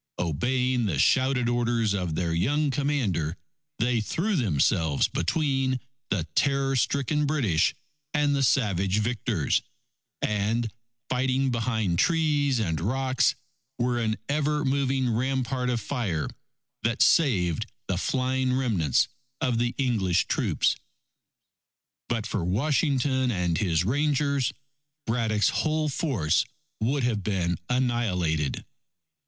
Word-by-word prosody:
Obeying 125 - 0
the 80 -7 -1
shouted 130 - +3
orders 120 -3 +1
of 90 -5 -2
their 85 -1 -1
young 140 - +1
Commander, 115 - -1 0.4
they 120 -1 +1
threw 190 - -1
themselves 80 - +2
between 135 - 0 0.3
the 95 -5 0
terror 135 - +1
stricken 140 +3 +1
British 110 - +1 0.4
and 145 -1 +2
the 140 - 0
savage 100 -7 +2
victors, 105 - 0 0.6
and, 105 +2 0 0.3
fighting 130 +1 +1
behind 110 -7 0
trees 150 - +2
and 85 -8 -1
rocks, 130 +6 +1 0.4
were 120 0 0
an 110 -2 0
ever 150 +1 0
moving 135 -1 +1
rampart 130 0 -1
of 120 -2 0
fire 110 - -2 0.5
that 115 +2 +2
saved 95 - +2 0.2
the 95 - 0
flying 130 +2 0
remnants 100 - +2 0.3
of 120 -3 0
the 120 0 0
English 110 -10 +1
troops. - - +1 1.3
But 115 -3 -1
for 105 -4 -2
Washington 130 - +1
and 90 -6 0
his 85 -4 +1
Rangers, 140 +1 +1 0.5
Braddock's 110 -3 +1
whole 155 -1 0
force 125 - +1 0.4
would 130 +5 0
have 115 -4 0
been 90 -4 -1
annihilated. 95 - 0
120 Hz, 115 wpm, -26 LUFS, 100-135 Hz, 1.3 s, shouted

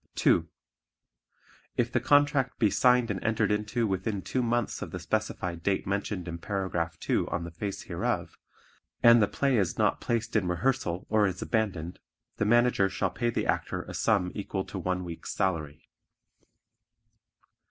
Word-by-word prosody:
(2) - - +3 1.3
If 120 -1 +1
the 120 - +2
contract 140 0 +3
be 110 -5 +3
signed 125 -2 +4
and - - -4
entered 115 -2 +1
into 105 +3 0
within 95 0 -2
two 125 +8 -1
months 120 -2 -1
of - - -4
the - - -5
specific 85 -2 -2
date 95 +2 0
mentioned 100 -2 -2
in 85 0 -5
Paragraph 85 -4 -2
2 - - 0
on - - -2
the 85 - -7
face 100 +4 -5
hereof - - -2 0.7
and 115 0 +8
the 105 - +4
play 135 -3 +1
is 95 -5 0
not - - +1
placed 115 -1 -2
in 100 -5 +2
rehearsal 90 -2 -1
or 105 -2 +4
is 95 -1 -4
abandoned, 95 -7 -2 0.4
the 110 - +1
Manager 120 -3 +4
shall 95 -1 -1
pay 120 - -1
the - - -1
Actor - - -1
a - - -9
sum 100 -5 +1
equal 100 -2 -3
to 95 - -6
one 90 +1 -1
week's 85 -2 -6
salary. 80 -5 -2
100 Hz, 165 wpm, -28 LUFS, 90-115 Hz, 1.3 s, and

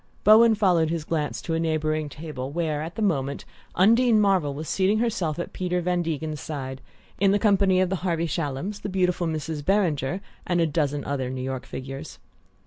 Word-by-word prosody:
Bowen 220 +1 +7
followed 180 -6 +3
his 165 -1 -2
glance 155 -2 -2
to 165 - -3
a 165 - +1
neighbouring 155 -1 -1
table, 145 -3 -6
where, 155 -1 -2
at 165 +2 -6
the 220 - -2
moment, 140 -8 -1 0.3
Undine 225 +4 +5
Marvell 185 -9 +2
was 155 +2 -6
seating 195 +2 +2
herself 195 -9 -1
at 175 - -5
Peter 180 -1 -1
Van 180 0 0
Degen's 155 -3 -3
side, 135 -3 -5 0.4
in 195 - +4
the 200 - +4
company 200 -3 +3
of 185 -1 +1
the 190 - 0
Harvey 170 -2 -1
Shallums, 165 +5 -3
the - - -4
beautiful 180 -2 +1
Mrs. 155 -1 -3
Beringer 180 -4 +1 0.3
and 175 -1 +1
a 165 - +4
dozen 145 -2 -1
other 135 -3 -2
New 130 0 -4
York 130 0 -4
figures. 135 +1 -7
165 Hz, 190 wpm, -25 LUFS, 145-190 Hz, 0.4 s, Bowen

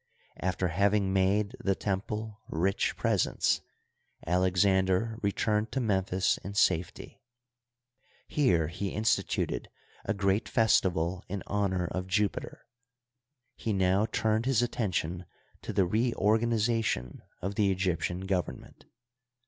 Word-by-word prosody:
After 95 0 -1
having 100 +2 +2
made 100 +4 +2
the 95 -1 0
temple 105 +2 -3
rich 95 +5 0
presents, - - +1 0.6
Alexander 95 +4 +2
returned 105 +2 0
to 135 - 0
Memphis 95 -5 +1
in 100 +1 -8
safety. 90 -4 0 1.1
Here 90 - +2
he 95 +4 -3
instituted 110 +2 0 0.3
a - - -1
great 100 +2 +1
festival 95 -5 +2
in 100 +1 -4
honor 95 -3 0
of 95 0 -3
Jupiter. 100 +2 -1 0.9
He 110 - -2
now 95 +2 +2
turned 110 +2 0
his 125 -3 +3
attention 90 -7 -2 0.4
to - - -5
the 95 -2 +2
reorganization 110 - +1 0.2
of 95 +2 -3
the 100 -1 +2
Egyptian 90 -1 -1
government. 95 -2 -4
100 Hz, 110 wpm, -29 LUFS, 95-110 Hz, 1.1 s, his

